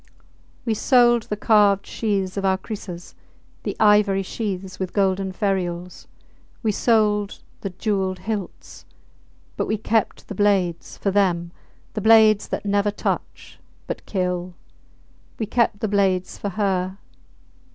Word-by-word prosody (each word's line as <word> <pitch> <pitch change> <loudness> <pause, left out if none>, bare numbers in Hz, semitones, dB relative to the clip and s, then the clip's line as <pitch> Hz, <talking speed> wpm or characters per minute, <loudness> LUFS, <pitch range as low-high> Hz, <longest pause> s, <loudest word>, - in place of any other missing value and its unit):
We 230 - +1
sold 240 0 +4
the 210 - -2
carved 205 -2 +4
sheaths 195 -4 -2
of 200 - -2
our 190 -1 +2
krisses 190 -3 -8 0.5
the - - -4
ivory 210 -2 +4
sheaths 190 -2 -5
with 185 -1 -3
golden 195 -1 +1
ferules. 180 -3 -3 0.6
We 220 - +2
sold 210 -2 +1 0.2
the 195 - -4
jewelled 190 -1 -1
hilts. 205 -2 -6 0.7
But - - -1
we 215 - 0
kept 220 0 -1
the - - -6
blades 190 -4 0
for 195 - -1
them. 175 -4 +1 0.4
The 215 - -3
blades 220 -1 +6
that - - -4
never 200 0 +2
touch 205 - -4 0.3
but - - -5
kill 180 -2 -2 0.8
we 220 - -2
kept 215 -1 +1
the 220 - 0
blades 195 -3 +1
for 205 - -4
her. 190 -2 -1
200 Hz, 130 wpm, -23 LUFS, 185-215 Hz, 0.8 s, blades